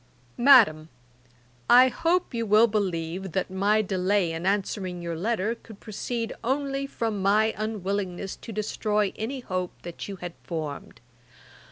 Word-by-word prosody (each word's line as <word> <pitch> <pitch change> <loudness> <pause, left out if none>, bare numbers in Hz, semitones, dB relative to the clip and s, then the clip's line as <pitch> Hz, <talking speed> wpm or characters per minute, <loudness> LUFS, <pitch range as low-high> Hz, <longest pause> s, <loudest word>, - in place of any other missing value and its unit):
'MADAM, 220 - +6 0.8
'I 250 +2 +8
hope 335 +5 0
you 230 -1 -1
will 215 +3 +6
believe 185 -4 -2
that 190 0 -1
my 205 +3 +2
delay 190 -2 +1
in 165 +3 -3
answering 190 -2 -1
your 170 -1 -4
letter 215 +4 -1
could 225 -3 -14
proceed 230 +2 -4
only 275 +2 -1
from 225 -6 -3
my 215 +3 +3
unwillingness 200 -3 -3
to 230 - -9
destroy 210 -1 -1
any 255 +5 -4
hope 185 -5 -4
that 175 -1 -7
you 200 - -5
had 175 -2 -7
formed. 155 -8 -6
205 Hz, 140 wpm, -26 LUFS, 185-230 Hz, 0.8 s, I